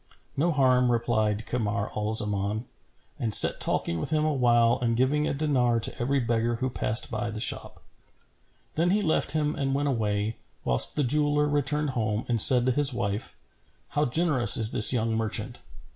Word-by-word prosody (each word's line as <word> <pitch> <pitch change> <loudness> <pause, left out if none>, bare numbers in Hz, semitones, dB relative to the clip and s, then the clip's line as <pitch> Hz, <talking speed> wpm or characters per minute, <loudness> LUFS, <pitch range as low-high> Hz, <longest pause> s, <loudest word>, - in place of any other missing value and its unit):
"No 170 +5 0
harm," 130 -4 +1
replied 110 -2 -2
Kamar 105 -4 -4
al 105 0 -3
Zaman 105 +1 +1 0.5
and 110 -3 +6
sat - - +7
talking 85 - 0
with - - -5
him 155 0 -1
awhile 120 -5 +1
and 115 -1 -1
giving 140 +5 0
a - - -2
dinar 130 -6 0
to 115 - -2
every 135 +3 -1
beggar 115 -1 -2
who 130 +2 -4
passed 115 0 0
by 115 +1 -4
the 110 0 -7
shop. - - -1 0.9
Then 170 +3 -1
he 205 +3 0
left 160 -3 -1
him 150 -1 -2
and 135 -2 -3
went 145 +1 -2
away, 105 -3 -3 0.3
whilst 60 -1 -1
the 150 - -1
jeweller 150 +2 0
returned 145 0 -2
home 110 -3 -3
and 115 -3 +4
said 125 +1 +6
to 130 - +1
his 145 +2 +1
wife, 110 -4 -4 0.5
'How 150 +1 -1
generous 145 -2 +2
is 110 -2 +4
this 105 - +4
young 115 -2 -2
merchant! 110 -1 -3
120 Hz, 175 wpm, -25 LUFS, 110-145 Hz, 0.9 s, sat